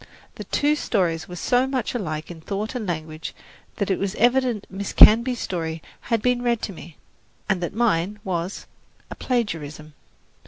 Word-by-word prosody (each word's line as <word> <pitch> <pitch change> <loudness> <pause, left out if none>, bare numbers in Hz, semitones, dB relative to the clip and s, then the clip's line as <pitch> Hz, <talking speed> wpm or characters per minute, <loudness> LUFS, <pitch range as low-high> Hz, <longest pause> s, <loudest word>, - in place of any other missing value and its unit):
The - - -8
two 295 +1 +2
stories 175 - 0
were 180 - -8
so 245 +8 +2
much 260 -4 -2
alike 155 -9 -4
in 165 -2 -10
thought 205 +5 -3
and 235 -5 -4
language 155 -2 -5 0.4
that 200 -1 -1
it 190 - +1
was 195 +1 -2
evident 245 -2 +2
Miss 195 +1 -5
Canby's 235 +3 +7
story 165 -3 -3 0.2
had 230 -3 -1
been 250 -1 +2
read 240 -2 +1
to 200 - -3
me, 165 -2 -12 0.5
and 190 -3 +1
that 175 - -3
mine 210 -4 +1
was 180 -1 -3 0.5
a - - -5
plagiarism. 155 - -3
200 Hz, 165 wpm, -24 LUFS, 165-240 Hz, 0.5 s, Canby's